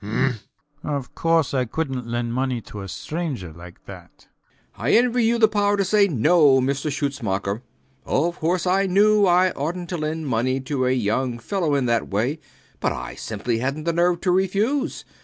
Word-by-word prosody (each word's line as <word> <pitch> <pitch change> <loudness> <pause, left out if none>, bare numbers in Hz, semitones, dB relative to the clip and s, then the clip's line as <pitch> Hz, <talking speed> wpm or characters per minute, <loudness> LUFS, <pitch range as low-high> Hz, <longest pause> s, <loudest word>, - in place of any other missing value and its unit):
Of 140 -4 -4
course 165 -4 +1
I 130 -2 +1
couldnt 130 -2 -3
lend 120 0 -2
money 130 -1 -1
to 105 -1 -9
a 95 - -7
stranger 125 - -5
like 85 +2 -13
that. - - -11
B. - - -23
B. - - -27 0.6
I 120 - +1
envy 240 0 +3
you 235 +1 +2
the 225 -1 +5
power 205 -1 +1
to 200 - +1
say 200 +1 +4
No, 150 - +4
Mr 140 +3 -1
Schutzmacher. 115 -8 -2 0.4
Of 170 +5 0
course, 175 +3 0
I 190 +2 +2
knew 205 +2 +4
I 180 +1 +4
oughtnt 170 +5 -4
to 175 - -2
lend 155 0 -3
money 130 +1 0
to 130 -1 -1
a - - +2
young 125 +1 0
fellow 165 - -1
in 135 -2 +1
that 115 -1 0
way; 120 +10 -1 0.4
but - - 0
I - - -6
simply 115 +2 -3
hadnt 140 +5 -3
the 170 - +1
nerve 175 +1 +2
to 180 - +1
refuse. 200 +9 0
150 Hz, 185 wpm, -23 LUFS, 125-180 Hz, 0.6 s, the